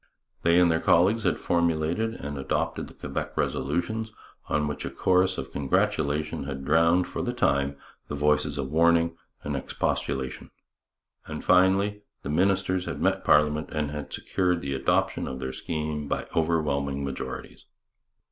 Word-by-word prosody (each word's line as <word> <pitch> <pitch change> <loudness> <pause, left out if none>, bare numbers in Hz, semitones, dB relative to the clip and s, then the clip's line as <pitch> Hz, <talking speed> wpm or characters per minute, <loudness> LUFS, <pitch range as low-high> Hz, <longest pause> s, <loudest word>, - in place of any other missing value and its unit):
They 85 +1 +4
and 90 -1 +5
their 80 - +2
co - - +3
delegates 110 +4 +1
had - - +2
formulated 85 +6 0
and 75 0 -6
adopted 70 -1 -2
the - - -15
Quebec - - -5
resolutions, 90 +11 -1 0.4
on 75 0 +1
which 75 - -4
a - - -3
chorus 95 0 +2
of - - -5
congratulation 75 +2 0
had 70 -1 -5
drowned, 85 +4 +4
for - - -4
the - - -2
time, 70 0 +1 0.3
the 75 - -4
voices 75 +1 +1
of 65 - -3
warning 85 +1 +3 0.3
and 75 0 -3
expostulation. 65 -1 -2 0.8
And, 75 -1 -6
finally, 95 +3 +4 0.2
the 70 - -3
ministers 95 +2 +1
had - - -4
met - - +1
parliament 75 +1 +3
and 75 -2 -2
had 75 -1 -6
secured 90 -2 0
the 70 0 -3
adoption 65 0 +1
of 65 - -5
their 65 0 -4
scheme 75 -2 -3
by - - -2
overwhelming 70 -4 0
majorities. 65 -1 -6
75 Hz, 155 wpm, -27 LUFS, 70-90 Hz, 0.8 s, and